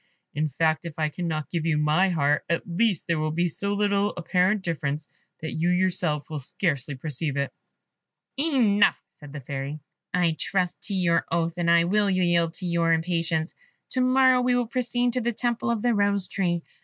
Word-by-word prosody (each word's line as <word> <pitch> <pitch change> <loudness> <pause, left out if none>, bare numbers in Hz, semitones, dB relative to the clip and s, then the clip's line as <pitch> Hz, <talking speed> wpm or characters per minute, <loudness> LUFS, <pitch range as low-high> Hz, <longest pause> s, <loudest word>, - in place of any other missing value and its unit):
In 155 +1 0
fact, 155 +3 0
if 165 -3 -7
I 155 -1 0
cannot 160 -2 -4
give 170 -3 -1
you 160 -2 +1
my 150 +6 +3
heart, 150 -4 +1
at 170 - 0
least 190 +1 0
there 165 -2 0
will 155 0 0
be 170 +3 0
so 200 +5 -2
little 205 0 +1
apparent 185 +4 +1
difference, 150 -3 -3 0.3
that 160 - -4
you 165 +2 0
yourself 180 -4 0
will 155 -2 -5
scarcely 145 -3 -2
perceive 145 +1 -3
it." 140 - -2 0.8
"Enough," 255 -9 +3
said 150 -4 -14
the 145 -1 -7
Fairy; 140 +3 -5 0.3
"I 175 -2 +2
trust 185 -2 -1
to 200 - -2
your 175 -3 +1
oath, 170 0 0
and 170 -1 0
I 170 0 +5
will 205 +3 +2
yield 175 -3 +2
to 185 - -6
your 170 -1 +1
impatience. 165 0 -1 0.4
To 255 - 0
morrow 255 0 +4
we 250 0 +2
will 245 -1 +1
proceed 245 0 0
to 250 - 0
the 240 +1 -1
temple 235 +1 -1
of 230 -3 -1
the 240 -1 +3
Rose 200 -2 +1
tree. 175 -4 -1
175 Hz, 190 wpm, -25 LUFS, 160-200 Hz, 0.8 s, I